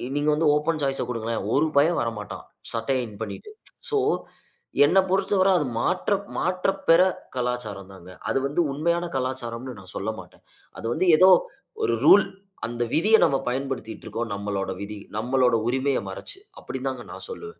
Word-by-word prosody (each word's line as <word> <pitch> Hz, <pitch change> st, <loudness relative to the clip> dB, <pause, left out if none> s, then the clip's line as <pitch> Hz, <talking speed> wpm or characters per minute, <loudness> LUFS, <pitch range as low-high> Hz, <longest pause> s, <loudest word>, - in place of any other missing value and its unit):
நீங்க 145 Hz, +1 st, +1 dB
வந்து 155 Hz, +1 st, +2 dB
open 155 Hz, +1 st, 0 dB
choice 135 Hz, -1 st, 0 dB
ஆ -, -, -4 dB
குடுங்களேன். 115 Hz, -2 st, -2 dB
ஒரு 150 Hz, +3 st, +3 dB
பய 145 Hz, +3 st, +6 dB
வரமாட்டான். 115 Hz, -3 st, -5 dB, 0.3 s
சட்டைய 120 Hz, +2 st, 0 dB
இன் 105 Hz, -2 st, -12 dB
பண்ணீட்டு. 110 Hz, -, -6 dB, 0.4 s
ஸோ, 440 Hz, -, +1 dB, 0.9 s
என்ன 170 Hz, +7 st, +3 dB
பொறுத்தவர 190 Hz, 0 st, +2 dB
அது 150 Hz, -, 0 dB
மாற்ற 180 Hz, -, 0 dB, 0.3 s
மாற்றப் 185 Hz, +2 st, 0 dB
பெற 165 Hz, +2 st, +8 dB, 0.3 s
கலாச்சாரம் 120 Hz, -6 st, -3 dB
தான்ங்க. 95 Hz, -1 st, -13 dB, 0.2 s
அது -, -, +1 dB
வந்து 145 Hz, +5 st, 0 dB
உண்மையான 170 Hz, +4 st, 0 dB
கலாச்சாரம்னு 130 Hz, -2 st, -3 dB
நான் 95 Hz, -1 st, -12 dB
சொல்லமாட்டேன். 110 Hz, +2 st, -6 dB, 0.4 s
அது -, -, -8 dB
வந்து 185 Hz, -, 0 dB
ஏதோ 185 Hz, +3 st, +7 dB, 0.5 s
ஒரு 115 Hz, -, +2 dB
ரூல் 190 Hz, +5 st, +8 dB, 0.4 s
அந்த 120 Hz, 0 st, -2 dB
விதிய 210 Hz, +8 st, +5 dB
நாம் 135 Hz, -, +2 dB
பயன்படுத்திட்ருக்கோம். 125 Hz, -3 st, -4 dB
நம்மளோட 100 Hz, -1 st, -3 dB
விதி 105 Hz, +1 st, -6 dB, 0.2 s
நம்மளோட 125 Hz, +1 st, +2 dB
உரிமைய 130 Hz, +2 st, +1 dB
மறைச்சு, 385 Hz, -, -7 dB, 0.2 s
அப்டின் -, -, -5 dB
தான்ங்க -, -, -4 dB
நான் -, -, -9 dB
சொல்லுவேன். 435 Hz, 0 st, -9 dB
130 Hz, 155 wpm, -25 LUFS, 115-165 Hz, 0.9 s, பெற